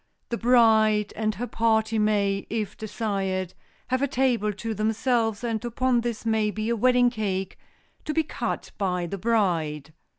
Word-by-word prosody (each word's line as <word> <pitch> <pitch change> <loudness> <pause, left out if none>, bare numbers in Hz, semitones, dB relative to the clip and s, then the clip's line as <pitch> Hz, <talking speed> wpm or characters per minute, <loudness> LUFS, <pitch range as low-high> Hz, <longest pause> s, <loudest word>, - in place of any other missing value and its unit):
The 235 - -2
bride 220 -3 +4
and 215 -1 -1
her 235 +6 -3
party 220 -2 +1
may, 200 -2 +1
if 215 -2 -3
desired, 195 -4 -3 0.4
have 255 +1 +1
a 280 - +2
table 250 -5 +1
to 220 +3 -4
themselves, 225 +1 0
and 230 -2 -2
upon 245 +1 +1
this 235 -1 -4
may 220 -1 +2
be 215 +1 -3
a 235 - +1
wedding 245 +1 +4
cake, 195 -5 -3 0.5
to 305 - -2
be 320 - +3
cut 310 - -4
by 180 -3 0
the 195 +3 -5
bride. 165 -9 0
220 Hz, 160 wpm, -25 LUFS, 200-235 Hz, 0.5 s, bride